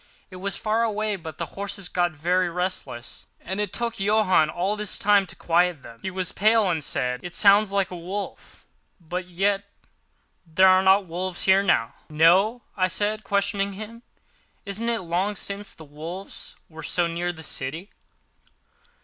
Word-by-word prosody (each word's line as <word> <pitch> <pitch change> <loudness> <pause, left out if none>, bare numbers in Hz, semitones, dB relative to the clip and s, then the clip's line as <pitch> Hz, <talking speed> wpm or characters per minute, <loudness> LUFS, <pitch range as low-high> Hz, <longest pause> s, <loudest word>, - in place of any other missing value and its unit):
It 185 - -9
was 195 +2 -2
far 220 +1 0
away; 215 -2 0
but 165 -4 -8
the - - -2
horses 200 -1 -4
got 175 -1 0
very 175 +4 +1
restless, 180 -9 -4
and 190 +3 -5
it 205 -3 -2
took 235 +1 -2
Johann 195 -6 +3
all 185 +6 -1
his 210 -1 -2
time 205 -1 +4
to - - -8
quiet 175 -3 +1
them. 115 0 -12
He - - -3
was 185 -1 -3
pale, 215 -2 +3
and 160 -3 -1
said, 125 -2 -1
"It 175 0 -8
sounds 205 0 +5
like 200 -2 0
a - - -5
wolf—but 180 -1 -7
yet 195 +3 0 0.8
there 185 +2 +4
are 185 0 +6
no 190 +1 +6
wolves 180 0 -4
here 190 +1 +5
now." 115 -12 +1 0.2
"No?" 185 +10 +4
I 185 -2 +2
said, 210 +4 -1
questioning 200 0 0
him; 215 +4 -9 0.6
"isn't 210 +4 -1
it 230 -1 0
long 185 +4 -1
since 200 +1 -6
the 160 - -12
wolves 160 +6 -8
were 160 -1 -11
so 175 +3 +1
near 170 +1 -2
the 160 -2 -11
city?" 160 +8 -4
185 Hz, 165 wpm, -25 LUFS, 170-205 Hz, 0.8 s, are